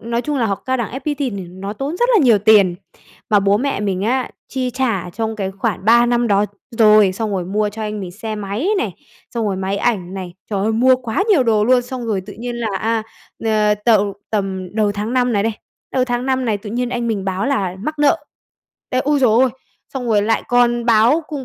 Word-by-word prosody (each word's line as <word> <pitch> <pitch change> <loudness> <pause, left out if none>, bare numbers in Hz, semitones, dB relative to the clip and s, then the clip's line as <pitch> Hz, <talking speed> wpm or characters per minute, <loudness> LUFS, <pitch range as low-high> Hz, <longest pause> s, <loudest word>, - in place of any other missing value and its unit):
nói 235 +1 -2
chung 295 +1 -2
là 230 - +1
học 195 -2 -3
Cao 260 0 +1
đẳng 235 -4 -3
FPT 290 +2 -3
thì 275 -4 -1
nó 190 0 -6
tốn 275 +9 -4
rất 485 +4 +2
là - - +6
nhiều 230 -5 +5
tiền, 200 -3 +5 0.6
mà 205 - +5
bố 200 +1 +3
mẹ 275 -4 -1
mình 195 -2 -1
á, 250 +4 0 0.2
chi 255 -1 -2
trả 230 -9 -1
trong 220 +3 -3
cái 195 -2 -2
khoảng 195 0 -3
3 235 +2 +5
năm 240 0 +1
đó 200 0 +3 0.3
rồi, 210 -3 +6
xong 215 +2 -3
rồi 185 -3 -1
mua 210 +3 0
cho 220 +2 -7
anh 210 -1 -4
mình 185 - -6
xe 215 +4 -6
máy 210 - -3
này, - - -2 0.4
xong 230 -2 -1
rồi 195 -2 -1
máy 190 +1 -2
ảnh 190 -5 -1
này, 185 -2 -6 0.2
trời 200 - -1
ơi, 220 +3 +1
mua 255 +3 +4
quá 245 - -2
nhiều 370 -11 +5
đồ 220 -3 +2
luôn, 250 +2 +4
xong 245 -1 -6
rồi 210 -4 0
tự 205 - -8
nhiên 240 +2 -5
là, 235 -2 -2
a, 225 +1 0 0.4
ờ, 215 -1 +2
t 235 - +4 0.4
tầm 190 -3 -2
đầu 210 -2 +1
tháng 210 +3 -3
5 250 -1 +2
này 200 -2 +1
đây, 225 +1 0 0.4
đầu 255 -1 +2
tháng 245 0 -2
5 260 -1 0
này 220 -4 0
tự 205 +1 -8
nhiên 245 +2 -1
anh 240 -1 -2
mình 205 -4 -2
báo 190 +4 -1
là 195 -10 -1
mắc 305 +8 -4
nợ. 290 -1 +2 0.7
Ê, 255 - 0
ôi 290 +1 +1
giời 255 -4 +4
ơi! 245 +4 +4 0.5
Xong 255 -2 -3
rồi 210 -2 +3
lại 225 +2 +1
còn 240 -1 +2
báo 235 +8 +4
cùng 285 -4 -5
225 Hz, 240 wpm, -19 LUFS, 200-250 Hz, 0.7 s, là